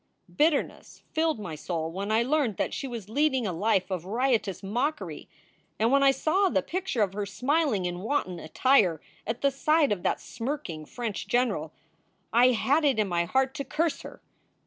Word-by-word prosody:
Bitterness 300 -1 0
filled 320 -5 +1
my 180 -6 -6
soul 160 +1 -3
when 200 +4 -4
I 225 +2 +3
learned 265 -5 0
that - - -1
she 275 - -4
was 230 -6 -6
leading 265 +1 +1
a 190 - -1
life 195 +1 +1
of 180 -3 -2
riotous 220 -2 0
mockery, 245 +10 -3 0.5
and 225 +2 +2
when 275 0 +4
I 275 - +6
saw 320 +9 +2
the - - +1
picture 355 - -1
of 195 -2 -2
her 205 0 -3
smiling 255 - 0
in 175 0 -3
wanton 185 -5 -2
attire 180 - +3 0.3
at 225 +2 -3
the 280 - +3
side 305 +1 +2
of 200 -4 -1
that - - 0
smirking 230 - -5
French 230 -4 -4
general, 210 -11 0 0.6
I 240 +2 +6
had 265 +5 +2
it 280 -5 +3
in 215 -2 +2
my 170 -2 0
heart 265 +7 +1
to 280 - -4
curse 305 +4 -1
her. - - -11
235 Hz, 185 wpm, -27 LUFS, 195-280 Hz, 0.6 s, I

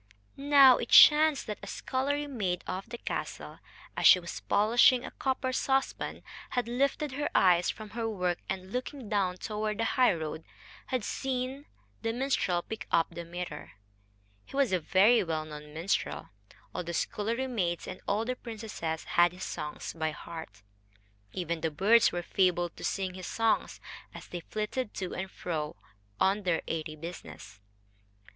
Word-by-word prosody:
Now 275 -2 +7
it 235 - -4
chanced 305 -1 +7
that 210 - -5
a - - -8
scullery 285 +3 -1
maid 200 -11 -2
of 190 +4 -5
the 240 - -6
castle, - - -5 0.4
as - - +4
she 185 - +9
was 170 -1 -7
polishing 240 +4 +4
a - - -7
copper 260 -1 -1
saucepan, 270 +1 -1 0.3
had 245 -2 -1
lifted 275 +4 0
her 290 +3 -2
eyes 180 -2 +5
from 215 -1 -6
her 230 -1 -2
work, 180 -4 -1
and, 190 0 -4
looking 255 -2 -4
down 190 -3 0
toward 210 +1 -3
the 230 - 0
highroad, 165 - +1 0.4
had 255 -4 -1
seen 265 +4 -3 0.4
the 225 - -1
minstrel 235 -9 0
pick 220 - -7
up 165 0 +2
the 170 - -6
mirror. 170 -3 -7 0.7
He - - -12
was 275 -5 +2
a 185 - +3
very 195 +9 +4
well 160 -3 -2
known 150 -1 -10
minstrel. 165 +6 -2 0.4
All - - -3
the 170 0 -5
scullery 230 +9 -1
maids 185 -9 -2
and 185 - -8
all 210 +3 +1
the 255 +1 -2
princesses 215 -10 -5
had 175 0 +3
his 180 - -8
songs 150 - -5
by 160 -1 -1
heart. 160 -7 -9 0.7
Even 170 0 -3
the 160 - 0
birds 210 +9 +4
were 175 0 -3
fabled 175 -2 +1
to - - -10
sing 190 -2 -2
his 185 -1 -7
songs, 225 -1 0 0.4
as - - -10
they 175 - -5
flitted 215 +6 -4
to 185 -2 -4
and 190 0 -4
fro 155 -5 -4 0.4
on 195 +2 +3
their 180 -4 0
airy 155 -1 -3
business. 150 - -9
200 Hz, 165 wpm, -30 LUFS, 175-245 Hz, 0.7 s, she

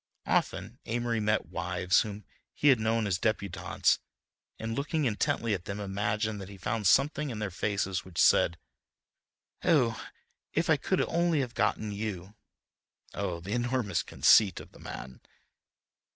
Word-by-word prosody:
Often - - -1
Amory 120 0 -1
met 105 0 +1
wives 90 +1 +1
whom 105 -2 -6 0.3
he 145 - +4
had 130 -4 +5
known 110 0 +1
as 95 -3 0
debutantes, 95 -4 0 0.6
and 110 0 -4
looking 150 +2 -1
intently 115 0 0
at 90 -3 -3
them 100 +1 -5
imagined 105 +1 -2
that 95 - -8
he 100 - -10
found 105 +2 -1
something 145 - +3
in 115 - -5
their 105 -3 -3
faces 95 -1 -1
which 90 -3 -13
said: 85 - +5 1.1
"Oh, 125 -9 +2 0.5
if - - +1
I - - +5
could - - 0
only 170 -3 +1
have 125 -3 -4
gotten 110 -1 0
you!" 100 -2 -5 0.8
Oh, 90 -4 -3
the 95 +4 -7
enormous 120 -7 0
conceit 100 -5 +4
of - - -12
the - - -17
man! 65 -1 -8
105 Hz, 150 wpm, -29 LUFS, 95-115 Hz, 1.1 s, had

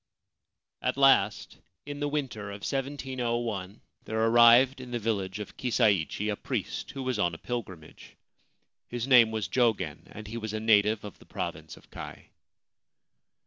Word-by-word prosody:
At 125 +1 -1
last, 135 -7 +3 0.3
in 145 0 -6
the 145 - -1
winter 130 -9 -3
of 100 0 -8
1701, 120 -7 -3 0.2
there 110 0 -3
arrived 120 +3 +6
at 125 -1 -9
the 120 - -1
village 100 -4 -2
of 105 - -8
Kisaichi 105 -5 +1
a - - -2
priest - - -4
who 135 - -5
was 130 -1 -2
on 85 -1 +1
a - - -8
pilgrimage. 95 -10 -7 0.7
His 120 +1 -4
name 125 -4 +7
was 110 -4 -3
Jogen, 100 - 0
and 110 - -9
he 115 +3 -6
was 110 -2 -5
a 110 - -2
native 110 -1 +3
of 105 - -10
the - - -17
Province - - -6
of - - -20
Kai. - - -9
115 Hz, 155 wpm, -28 LUFS, 105-125 Hz, 0.7 s, name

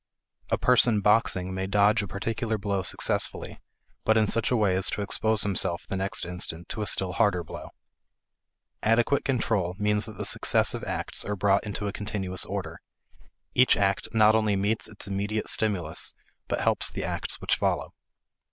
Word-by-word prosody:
A - - +1
person 120 -4 +4
boxing 95 -3 +2
may 95 0 -3
dodge 100 +1 +3
a 100 - -5
particular 110 +3 -2
blow 100 -1 -1
successfully, 95 - -1 0.4
but 110 0 +3
in 110 - +4
such 110 +2 +1
a 125 - +2
way 105 -5 +2
as 95 - +2
to 105 - -2
expose 110 +1 +1
himself 95 -3 -1
the - - -4
next 95 -1 -2
instant 85 -1 -6
to 110 - -4
a 105 - -1
still 95 -1 +2
harder 100 -5 +2
blow. - - -9 1.1
Adequate 115 +5 +2
control 110 -9 0
means 105 0 +1
that 110 -3 -10
the - - -4
successive - - +1
acts - - -3
are 105 - -3
brought 100 0 +2
into 105 0 -3
a 100 - -3
continuous 95 -3 -3
order; 90 -4 -5 0.7
each 125 +1 +5
act 100 -1 +1
not 110 -1 +5
only 110 -2 +2
meets 105 +3 -1
its 105 - -6
immediate 100 +2 -2
stimulus 95 -8 0 0.3
but - - -2
helps - - +1
the - - -5
acts - - -3
which - - 0
follow. - - -1
100 Hz, 170 wpm, -27 LUFS, 95-110 Hz, 1.1 s, each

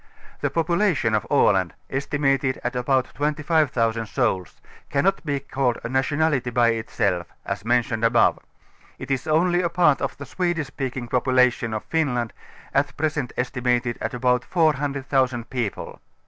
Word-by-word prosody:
The - - 0
population 170 - +1
of 105 - 0
Aland, - - +3
estimated 135 -1 0
at - - -2
about 130 +1 0
25,000 145 -7 0
souls, 110 -8 -1 0.3
cannot 190 +8 +1
be 145 -3 -1
called 135 -3 -1
a 115 - -4
nationality 135 0 +1
bj^ 115 -1 +2
itself, 90 -5 -1 0.2
as - - -4
mentioned 115 -1 +1
above; 115 +1 +4 0.6
it - - -7
is 135 +1 -1
only 175 +3 +3
a 170 - 0
part 165 -5 +3
of - - -3
the 140 - -8
Swedish 175 -3 -1
speaking 130 -2 -5
population 125 -1 +2
of 110 -1 -3
Finland, 125 -8 -1 0.4
at 140 -1 0
present 150 -4 -1
estimated 125 -1 0
at 110 +2 -3
about 125 0 +2
400,000 135 -6 0
people. 120 -6 -4
130 Hz, 140 wpm, -23 LUFS, 120-150 Hz, 0.6 s, above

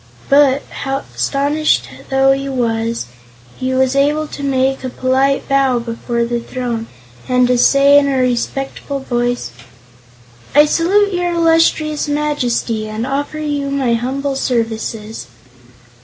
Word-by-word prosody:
But, 280 -1 +4 0.2
astonished 280 +2 0 0.2
though 270 -1 +4
he 275 0 -1
was, 230 - -1 0.5
he 260 0 -1
was 260 0 +2
able 295 +2 +2
to - - -8
make 270 -1 0
a 260 - -3
polite 265 +2 0
bow 270 -2 +2
before 235 0 -2
the 240 0 -2
throne 235 -2 -4 0.4
and 250 0 +3
to 250 - +2
say 275 +3 +5
in 280 - 0
a 275 -1 0
respectful 260 +3 -2
voice: 245 - -2 1.0
"I 295 +1 +7
salute 390 +6 +2
your 355 -1 -1
Illustrious 325 -2 +2
Majesty 250 -7 -1
and 215 +2 -3
offer 285 +3 -3
you 290 -2 -2
my 270 -4 0
humble 270 +4 -2
services." 225 -3 -3
270 Hz, 125 wpm, -16 LUFS, 245-285 Hz, 1.0 s, I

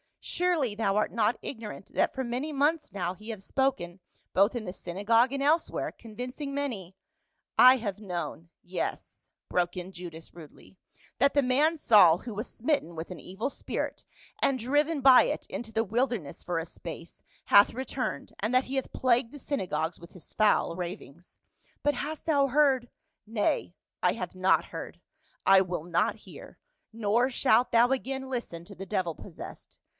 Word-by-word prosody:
Surely 335 -11 0
thou 205 -2 0
art 210 - +1
not 225 0 +1
ignorant 220 -6 -8
that - - +2
for 265 - -2
many 255 +5 -3
months 295 +2 +1
now 180 -3 -2
he 215 +4 -12
hath 215 -4 -6
spoken 225 -10 -1 0.3
both 200 +5 +4
in 230 -3 -3
the 180 - -5
synagogue 215 +8 +1
and 275 0 -2
elsewhere, 310 +4 +1
convincing 250 +5 -7
many 225 -11 -4 0.2
— 320 +1 -50
" - - -49
" - - -61
I 255 +1 +9
have 205 -4 -4
known 170 -4 -5
— - - -63
yes," 180 -1 -5 0.2
broke 175 0 0
in 180 +1 -6
Judas 170 -3 -9
rudely, 170 +3 -14 0.2
" - - -29
that 280 +2 +4
the 285 - +5
man 285 +6 +3
Saul, 190 - +6
who 235 - -7
was 215 +4 -4
smitten 245 - -1
with 160 +1 -6
an 180 - -7
evil 190 +8 -4
spirit, - - -4 0.4
and 275 - +3
driven 290 +5 +1
by 265 -1 +8
it - - -2
into 225 -2 -6
the 225 +1 +1
wilderness 230 - -2
for 175 -2 -2
a 165 - -4
space, 165 0 -10 0.2
hath 200 0 +6
re 260 +2 -4
turned, 255 0 -4
and 215 +4 -1
that 255 +1 +4
he 265 - -4
hath 265 - -2
plagued 245 -2 +2
the 290 - -9
synagogues 175 - -2
with 170 - -14
his 180 - -13
foul 210 -5 +3
ravings." 175 -2 -8 0.2
" - - -36
But 290 0 +2
hast 310 +1 -5
thou 285 -4 +3
heard 265 -3 +3
— 315 - -49
" 315 - -53
" - - -53
Nay, 210 -5 -1 0.3
I 180 - +3
have 185 -5 -6
not 185 +1 +3
heard. - - -8 0.5
I 195 0 +7
will 180 -4 -3
not 175 +1 +1
hear. - - -13 0.4
Nor 230 +3 +2
shalt 245 -1 +3
thou 235 +1 +5
again 265 0 -2
listen 205 -10 -5
to 200 - -11
the 195 +1 -8
devil 185 -4 -1
possessed. - - -11
225 Hz, 190 wpm, -28 LUFS, 180-265 Hz, 0.5 s, I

